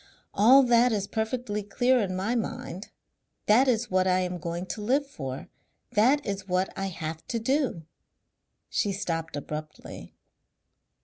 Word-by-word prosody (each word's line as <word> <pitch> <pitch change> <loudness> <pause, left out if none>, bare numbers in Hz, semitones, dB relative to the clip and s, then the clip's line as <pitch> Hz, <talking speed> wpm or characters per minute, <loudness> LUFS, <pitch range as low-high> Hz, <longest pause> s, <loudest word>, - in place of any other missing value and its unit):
"All 255 +7 +7
that 240 0 +4
is 205 -3 0
perfectly 220 0 -2
clear 245 +5 +2
in 190 -4 -1
my 195 +6 -1
mind. 230 -4 -4 0.6
That 240 +6 +5
is 240 -3 +1
what 185 0 +2
I 185 0 +3
am 180 -1 -3
going 170 +1 -4
to 210 - -6
live 265 +7 +1
for; 135 - -7 0.4
that 260 +8 +3
is 195 -2 -4
what 185 +1 0
I 195 0 -2
have 160 -3 -5
to 235 - -2
do." 255 - 0 0.8
She 205 -2 0
stopped 165 -5 -3
abruptly. 150 +1 -7
205 Hz, 145 wpm, -27 LUFS, 180-240 Hz, 0.8 s, All